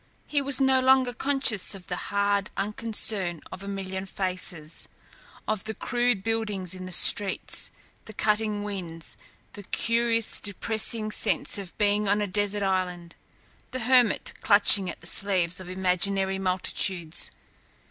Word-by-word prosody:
He 290 -2 0
was 275 -1 +2
no 265 -1 +4
longer 260 -1 +4
conscious 265 -7 +1
of 185 -2 -12
the 180 - -4
hard 200 -1 0
unconcern 205 -4 -1
of 185 - -8
a 200 - -9
million 190 -1 -5
faces, 180 -4 0 0.6
of 215 -2 -2
the 220 0 -4
crude 240 -4 0
buildings 210 -5 -2
in 185 0 -7
the - - -8
streets, 195 +2 +3 0.4
the 215 - -10
cutting 210 0 0
winds, 175 -6 -5 0.4
the 205 - -9
curious, 230 +2 0
depressing 215 +2 0
sense 205 - +1
of 190 -3 -10
being 205 0 +1
on 205 +1 +2
a 210 - 0
desert 205 +1 -1
island, 180 -3 -2 0.5
the 255 -1 -5
hermit 245 -1 +2
clutching 200 -2 +5
at - - -8
the - - -15
sleeves 180 -2 0
of 185 -1 -10
imaginary 190 +1 0
multitudes. 185 -2 -1
200 Hz, 140 wpm, -26 LUFS, 185-220 Hz, 0.6 s, clutching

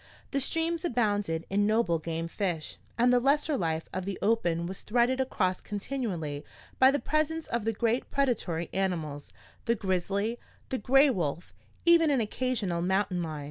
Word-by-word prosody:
The 275 - +1
streams 330 +4 0
abounded 205 - 0
in 205 +1 +2
noble 215 -7 +2
game 165 +1 -3
fish, 170 -3 -3 0.2
and 245 +1 +4
the 250 - +5
lesser 290 +4 +2
life 165 -7 -1
of 185 - -2
the 195 0 -4
open 175 -6 +1
was 185 +2 -5
threaded 245 +3 +2
across 185 -8 0
continually 195 - -4 0.4
by 260 - +8
the 280 - +2
presence 310 +2 0
of 235 -2 -2
the 225 - +2
great 230 +3 0
predatory 215 -12 0
animals 165 -7 -2 0.3
the 235 -1 +2
grizzly, 200 +3 -1 0.3
the 260 - -2
gray 270 +6 +5
wolf, 170 - -3 0.3
even 335 -2 +6
an 275 -3 +3
occasional 215 -6 -1
mountain 190 0 0
lion. 155 -3 -4
210 Hz, 160 wpm, -29 LUFS, 175-260 Hz, 0.4 s, by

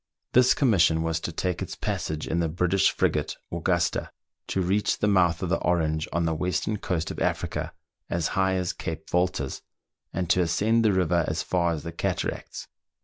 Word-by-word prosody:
This 125 0 +6
commission 85 - +3
was 80 0 0
to 85 - -4
take 90 +1 -2
its - - -4
passage 80 0 -3
in 85 - 0
the 85 -1 +1
British 90 +4 +2
frigate - - 0
"Augusta," 85 0 0 0.4
to - - -1
reach 95 +3 +1
the 105 - +1
mouth 90 -3 +3
of 90 - -1
the 95 - +1
Orange 80 -2 0
on 85 0 0
the 80 - +1
western 90 +5 -1
coast 85 -5 -2
of - - -6
Africa, - - -1 0.4
as 85 -2 0
high 95 0 +1
as 90 -1 -1
Cape 80 -1 -6
Voltas, 90 -6 0 0.5
and 90 0 -2
to 90 - +4
ascend 105 +7 +2
the 110 - +4
river 90 -2 +2
as 80 - -1
far 85 -2 +1
as 75 - -5
the 85 - -5
cataracts. 85 - -3
85 Hz, 185 wpm, -26 LUFS, 80-95 Hz, 0.5 s, This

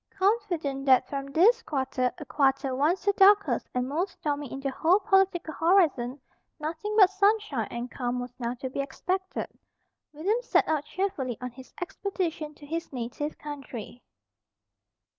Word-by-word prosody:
Confident 355 -10 0
that 260 -1 +5
from 275 -1 -4
this 400 +12 +4
quarter, 265 - -1
a 300 - -8
quarter 270 0 +1
once 315 +9 +1
the 405 - +4
darkest 405 +1 +5
and 250 0 0
most 340 +7 -1
stormy 290 -3 -3
in 270 - -5
the 275 0 -2
whole 340 +8 +3
political 380 -4 +2
horizon, 315 -8 +2 0.4
nothing 320 +7 -3
but 390 -3 +7
sunshine 395 - +1
and 240 +1 -5
calm 250 -1 -2
was 245 0 -6
now 240 0 -2
to 260 +1 -5
be - - -4
expected, 370 +7 -3 0.6
William 390 +11 0
set - - +2
out 305 -2 0
cheerfully 300 - -2
on 250 0 -5
his 260 +2 -13
expedition 350 -5 -3
to 290 - -13
his 330 +3 -4
native 260 +4 -4
country. 265 -5 -8
300 Hz, 155 wpm, -27 LUFS, 265-375 Hz, 0.6 s, but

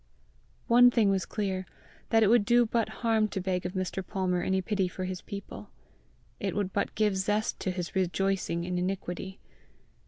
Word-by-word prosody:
One 245 +1 +7
thing 225 -5 +3
was 190 -3 0
clear 190 -3 -2 0.4
that 225 -1 +4
it - - +4
would 230 0 +5
do 240 +2 +4
but 230 0 0 0.2
harm 220 -2 +3
to 195 - -4
beg 180 -1 -1
of 180 - -8
Mr. 185 0 -3
Palmer 185 -2 -1
any 190 +1 +1
pity 190 0 0
for 185 +1 -5
his 185 -1 -4
people: 190 - -8 0.7
it 195 -2 -2
would 200 -2 -1
but 200 - -1
give 210 -2 +2
zest 210 +3 0
to - - -2
his 180 -2 -4
rejoicing 190 -2 0
in 180 0 -2
iniquity! 190 0 -4
190 Hz, 180 wpm, -29 LUFS, 185-210 Hz, 0.7 s, One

